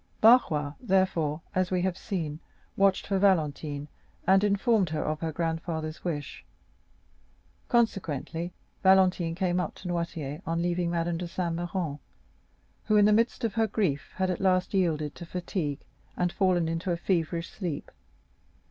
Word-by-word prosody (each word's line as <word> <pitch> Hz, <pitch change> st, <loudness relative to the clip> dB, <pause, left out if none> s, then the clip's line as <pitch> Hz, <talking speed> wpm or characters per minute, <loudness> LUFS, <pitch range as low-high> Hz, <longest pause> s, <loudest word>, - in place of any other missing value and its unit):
Barrois, 155 Hz, -, +5 dB
therefore, 185 Hz, -, +1 dB
as 185 Hz, 0 st, +1 dB
we 180 Hz, -1 st, 0 dB
have 185 Hz, -1 st, 0 dB
seen, 160 Hz, -6 st, -4 dB, 0.4 s
watched 195 Hz, -1 st, +3 dB
for 195 Hz, -1 st, 0 dB
Valentine, 150 Hz, -6 st, +1 dB, 0.4 s
and 190 Hz, +2 st, +5 dB
informed 200 Hz, -1 st, +2 dB
her 155 Hz, -1 st, -2 dB
of 155 Hz, 0 st, -2 dB
her 165 Hz, -1 st, -2 dB
grandfather's 160 Hz, -1 st, -3 dB
wish. 150 Hz, -5 st, -4 dB, 1.2 s
Consequently, 175 Hz, -, 0 dB, 0.3 s
Valentine 185 Hz, -3 st, +4 dB
came 180 Hz, -1 st, 0 dB
up 180 Hz, -, -3 dB
to 185 Hz, -, -9 dB
Noirtier, 170 Hz, -3 st, -3 dB
on 165 Hz, +1 st, -1 dB
leaving 175 Hz, 0 st, 0 dB
Madame 170 Hz, 0 st, -1 dB
de 175 Hz, -, -3 dB
Saint 170 Hz, -1 st, -2 dB
Méran, 175 Hz, -4 st, -3 dB, 0.9 s
who 215 Hz, -, +3 dB
in 205 Hz, -, +6 dB
the 210 Hz, -, +5 dB
midst 230 Hz, +3 st, +1 dB
of 225 Hz, -3 st, 0 dB
her 225 Hz, 0 st, +2 dB
grief 185 Hz, -9 st, -1 dB
had 185 Hz, -1 st, 0 dB
at 180 Hz, -, -3 dB
last 185 Hz, 0 st, +2 dB
yielded 155 Hz, -6 st, +1 dB
to -, -, -9 dB
fatigue 170 Hz, -4 st, -3 dB, 0.4 s
and 180 Hz, -1 st, +1 dB
fallen 180 Hz, -4 st, +2 dB
into 165 Hz, +3 st, -2 dB
a 170 Hz, -, +1 dB
feverish 170 Hz, -1 st, -1 dB
sleep. 175 Hz, -8 st, -5 dB
175 Hz, 150 wpm, -28 LUFS, 160-190 Hz, 1.2 s, in